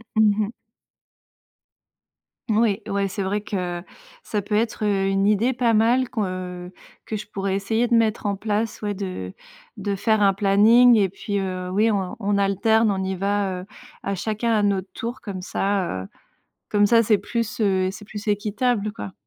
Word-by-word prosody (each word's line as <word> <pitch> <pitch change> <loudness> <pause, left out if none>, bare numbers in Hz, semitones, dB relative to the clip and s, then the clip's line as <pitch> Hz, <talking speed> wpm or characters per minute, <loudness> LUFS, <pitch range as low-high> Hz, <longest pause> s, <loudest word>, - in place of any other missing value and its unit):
Mmh 215 -1 +5 0.2
mh. - - -8 2.0
Oui, 215 -1 +2
ouais, 200 0 0
c'est 200 +1 -3
vrai 200 +2 -1
que 180 -4 -4 0.4
ça 210 - -2
peut 210 +1 -2
être, 220 0 0
heu, 195 -2 +1
une 195 +1 +2
idée 215 +4 +3
pas 240 -2 +1
mal 240 +4 +3
qu'on, 225 -4 -1
heu, 180 -1 -6 0.3
que 215 - -3
je 210 - -8
pourrais 195 -2 -2
essayer 220 +4 0
de 240 - +1
mettre 225 -2 +1
en 200 -1 0
place 215 +2 -2
ouais, 205 -1 -2
de 185 - -5 0.4
de 200 -1 -2
faire 220 +1 +2
un 195 -1 +5
planning 215 +5 +6
et 200 -4 +3
puis, 200 +2 -3
heu, 185 -1 -3
oui 215 +4 +3
on 195 -3 -2
on 200 0 +1
alterne, 220 +3 +3
on 190 -1 -1
y 190 0 -2
va, 195 -1 -1
heu, - - -12 0.4
à 200 - -2
chacun, 220 +4 -1
à 210 -2 +2
notre 195 -2 0
tour 235 +2 -5
comme 195 -3 -6
ça, 185 - -1
heu, 95 - -10 0.6
comme 205 0 +3
ça 230 +2 +5
c'est 215 -1 +3
plus, 230 +1 -3
heu, 190 -3 +2
c'est 210 - -10
plus 210 +1 -7
équitable 210 +1 0
quoi. 100 - -7
205 Hz, 185 wpm, -23 LUFS, 195-220 Hz, 2.0 s, planning